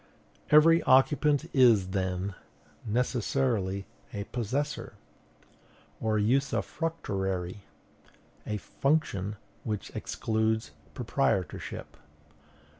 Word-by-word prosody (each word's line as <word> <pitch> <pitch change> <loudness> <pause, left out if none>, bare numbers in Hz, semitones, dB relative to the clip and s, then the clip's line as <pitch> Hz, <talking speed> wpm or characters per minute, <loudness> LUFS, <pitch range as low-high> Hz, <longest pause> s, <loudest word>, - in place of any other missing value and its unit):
Every 165 +2 +7
occupant 145 +3 +4
is, 115 -8 +5
then, 95 0 -2 0.5
necessarily 115 -4 0 0.3
a 100 - -4
possessor 125 +7 -3 1.1
or 110 -1 +1
usufructuary, 105 - -1 0.9
a 105 - -1
function 105 -6 0 0.3
which 105 -3 -4
excludes 110 -4 -1 0.2
proprietorship. 90 -4 -2
110 Hz, 65 wpm, -29 LUFS, 100-135 Hz, 1.1 s, Every